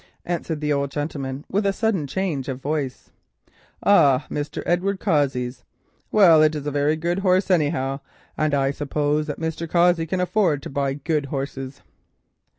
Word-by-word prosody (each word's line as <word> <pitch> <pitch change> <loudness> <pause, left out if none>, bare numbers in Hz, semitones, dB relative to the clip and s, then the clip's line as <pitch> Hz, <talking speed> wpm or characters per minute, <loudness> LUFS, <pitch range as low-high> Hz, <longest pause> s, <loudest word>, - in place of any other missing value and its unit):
answered 170 -3 -3
the 150 -1 +1
old 140 -1 -1
gentleman 140 -2 -4
with 205 +3 0
a 200 - +2
sudden 195 -7 -1
change 155 -4 -2
of 130 -1 -4
voice. 140 -2 -3 0.7
"Ah, 140 -10 +5
Mr. 145 0 -4
Edward 190 +3 0
Cossey's? 135 - 0 0.5
Well, 175 -7 +6
it's 155 0 +3
a 145 0 -3
very 145 +2 +1
good 170 +3 -1
horse 185 0 +2
anyhow, 145 -5 +1 0.4
and 155 -1 +1
I 135 -1 +1
suppose 150 +1 -1
that 150 - -5
Mr. 160 0 -3
Cossey 170 -1 +3
can 185 +3 -1
afford 180 -6 +1
to - - -7
buy 140 -1 -1
good 150 0 -1
horses." 135 -1 -5
150 Hz, 155 wpm, -23 LUFS, 140-175 Hz, 0.7 s, Well